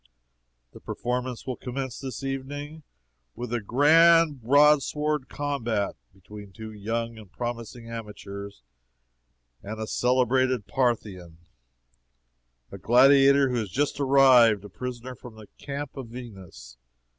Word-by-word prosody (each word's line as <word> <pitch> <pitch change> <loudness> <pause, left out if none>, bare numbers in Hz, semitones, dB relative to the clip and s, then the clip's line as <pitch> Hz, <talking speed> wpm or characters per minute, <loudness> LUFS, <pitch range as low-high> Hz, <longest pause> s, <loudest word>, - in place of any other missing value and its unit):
The - - -13
performance 125 0 -4
will 130 -2 -4
commence 130 -1 -5
this 135 0 -7
evening 145 +3 -5 0.5
with 120 0 -6
a 120 - -1
GRAND 155 +5 +4
BROADSWORD 150 +2 +2
COMBAT! 120 -8 -2 0.2
between 100 +1 -13
two 110 +2 -9
young 115 +2 -4
and 105 -4 -15
promising 120 0 -6
amateurs 100 - -8 1.0
and 110 +2 -7
a 110 - -3
celebrated 125 -1 +1
Parthian 105 -8 -2 1.4
gladiator 135 +3 +5
who 125 - -1
has 110 -4 -3
just 145 +7 -1
arrived 130 -7 +5
a - - -10
prisoner 125 +4 -7
from 120 -1 -13
the 110 -1 -12
Camp 140 -1 -6
of 135 -4 -7
Verus. 95 - -11
125 Hz, 115 wpm, -26 LUFS, 110-135 Hz, 1.4 s, gladiator